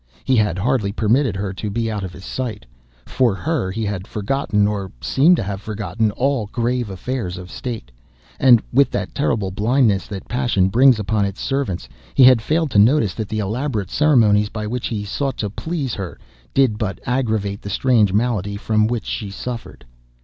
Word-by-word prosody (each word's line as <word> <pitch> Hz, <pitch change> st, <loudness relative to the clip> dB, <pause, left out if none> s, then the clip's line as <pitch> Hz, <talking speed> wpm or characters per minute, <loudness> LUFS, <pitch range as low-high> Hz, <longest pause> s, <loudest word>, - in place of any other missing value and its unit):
He 130 Hz, -, +2 dB
had 105 Hz, -6 st, +2 dB
hardly 110 Hz, 0 st, +1 dB
ever 100 Hz, -, -7 dB
permitted 115 Hz, +1 st, +2 dB
her 95 Hz, 0 st, -3 dB
to 105 Hz, +2 st, -4 dB
be 115 Hz, +2 st, -1 dB
out 105 Hz, -2 st, -3 dB
of 95 Hz, -, -5 dB
his 95 Hz, +1 st, -12 dB
sight; 120 Hz, -6 st, -4 dB, 0.4 s
for 120 Hz, -6 st, +1 dB
her, 140 Hz, -, -1 dB
he 110 Hz, +3 st, -3 dB
had 100 Hz, -2 st, -4 dB
forgotten, 105 Hz, -1 st, 0 dB
or 100 Hz, -3 st, -3 dB
seemed 160 Hz, -, +4 dB
to -, -, -2 dB
have 100 Hz, 0 st, -4 dB
forgotten, 110 Hz, +1 st, -2 dB
all 130 Hz, -3 st, 0 dB
grave 120 Hz, +1 st, -1 dB
affairs 95 Hz, -1 st, -4 dB
of 90 Hz, 0 st, -9 dB
State; 115 Hz, -, -6 dB, 0.5 s
and, 120 Hz, -4 st, +6 dB
with 140 Hz, +2 st, +5 dB
that -, -, -3 dB
terrible 105 Hz, -9 st, 0 dB
blindness 105 Hz, 0 st, +2 dB
that 100 Hz, -2 st, -7 dB
passion 120 Hz, -7 st, +1 dB
brings 125 Hz, +4 st, +5 dB
upon 105 Hz, 0 st, 0 dB
its 100 Hz, 0 st, -5 dB
servants, 135 Hz, -10 st, -2 dB, 0.3 s
he -, -, +6 dB
had 125 Hz, -2 st, +7 dB
failed 155 Hz, +3 st, 0 dB
to 100 Hz, -, +4 dB
notice 110 Hz, -3 st, +4 dB
that 110 Hz, -3 st, -5 dB
the 110 Hz, -, -3 dB
elaborate 110 Hz, -1 st, -2 dB
ceremonies 110 Hz, -9 st, +4 dB
by 105 Hz, -1 st, -5 dB
which 120 Hz, +3 st, -3 dB
he 105 Hz, -3 st, -3 dB
sought 135 Hz, +6 st, -2 dB
to 105 Hz, -2 st, -3 dB
please 150 Hz, -1 st, -3 dB
her 95 Hz, -4 st, -5 dB, 0.4 s
did 130 Hz, -6 st, +3 dB
but 100 Hz, -3 st, -2 dB
aggravate 110 Hz, -6 st, -1 dB
the 100 Hz, -, -7 dB
strange 110 Hz, -3 st, +3 dB
malady 105 Hz, -2 st, 0 dB
from 110 Hz, 0 st, +1 dB
which 120 Hz, -1 st, -2 dB
she 105 Hz, -, -4 dB
suffered. 115 Hz, -, -7 dB
110 Hz, 190 wpm, -20 LUFS, 100-125 Hz, 0.5 s, had